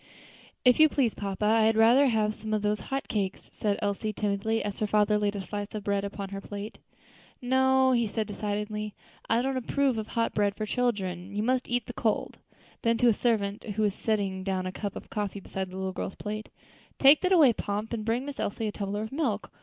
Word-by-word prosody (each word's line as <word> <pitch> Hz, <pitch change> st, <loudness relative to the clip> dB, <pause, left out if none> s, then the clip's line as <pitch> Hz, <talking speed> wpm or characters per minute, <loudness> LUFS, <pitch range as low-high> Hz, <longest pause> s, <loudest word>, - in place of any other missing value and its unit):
"If 250 Hz, +2 st, +6 dB
you 310 Hz, 0 st, +8 dB
please, 260 Hz, -6 st, +1 dB
papa, 200 Hz, 0 st, -3 dB
I 220 Hz, +1 st, +4 dB
had 220 Hz, 0 st, +3 dB
rather 240 Hz, +5 st, +6 dB
have 215 Hz, -3 st, +1 dB
some 215 Hz, 0 st, -3 dB
of 210 Hz, -, -2 dB
those 210 Hz, 0 st, +1 dB
hot 270 Hz, +8 st, -4 dB
cakes," 195 Hz, -3 st, -3 dB
said 205 Hz, -2 st, 0 dB
Elsie, 205 Hz, +1 st, -1 dB
timidly, 210 Hz, +2 st, -1 dB
as 205 Hz, -1 st, -4 dB
her 215 Hz, -, 0 dB
father 210 Hz, 0 st, +3 dB
laid 205 Hz, 0 st, 0 dB
a 200 Hz, -, -3 dB
slice 205 Hz, +1 st, -5 dB
of 210 Hz, -, -4 dB
bread 200 Hz, 0 st, 0 dB
upon 200 Hz, -1 st, -5 dB
her 195 Hz, 0 st, -6 dB
plate. 205 Hz, +1 st, -7 dB, 0.6 s
"No," 260 Hz, +1 st, +3 dB, 0.2 s
said 220 Hz, -2 st, -1 dB
he 205 Hz, -, -6 dB
decidedly; 210 Hz, 0 st, -3 dB, 0.3 s
"I 230 Hz, +2 st, +3 dB
don't 265 Hz, 0 st, -1 dB
approve 260 Hz, -1 st, +1 dB
of 215 Hz, -, -5 dB
hot 230 Hz, -1 st, -1 dB
bread 205 Hz, -1 st, +1 dB
for 215 Hz, -, -3 dB
children; 200 Hz, -6 st, -2 dB
you 210 Hz, -, 0 dB
must 255 Hz, +2 st, 0 dB
eat 245 Hz, 0 st, 0 dB
the 245 Hz, -, -7 dB
cold." 225 Hz, -3 st, -1 dB, 0.4 s
Then 230 Hz, 0 st, +2 dB
to 245 Hz, -, +5 dB
a -, -, +5 dB
servant 210 Hz, -2 st, 0 dB
who 215 Hz, 0 st, -2 dB
was 205 Hz, -2 st, +2 dB
setting 200 Hz, -3 st, -1 dB
down 190 Hz, -1 st, -1 dB
a 185 Hz, -, -2 dB
cup 200 Hz, +1 st, -5 dB
of -, -, -9 dB
coffee 205 Hz, -2 st, -3 dB
beside 190 Hz, -1 st, -5 dB
the 185 Hz, -, -8 dB
little 190 Hz, 0 st, -3 dB
girl's 185 Hz, -, -4 dB
plate, 215 Hz, +1 st, -5 dB, 0.5 s
"Take 280 Hz, +2 st, +7 dB
that 370 Hz, -, +1 dB
away, 305 Hz, -10 st, +7 dB
Pomp, 210 Hz, +2 st, -3 dB
and 220 Hz, -2 st, -2 dB
bring 230 Hz, +4 st, 0 dB
Miss 285 Hz, -1 st, -7 dB
Elsie 220 Hz, +2 st, -2 dB
a 210 Hz, -, -1 dB
tumbler 205 Hz, +1 st, -3 dB
of 220 Hz, -, -6 dB
milk. 265 Hz, -8 st, -2 dB
215 Hz, 225 wpm, -28 LUFS, 200-235 Hz, 0.6 s, you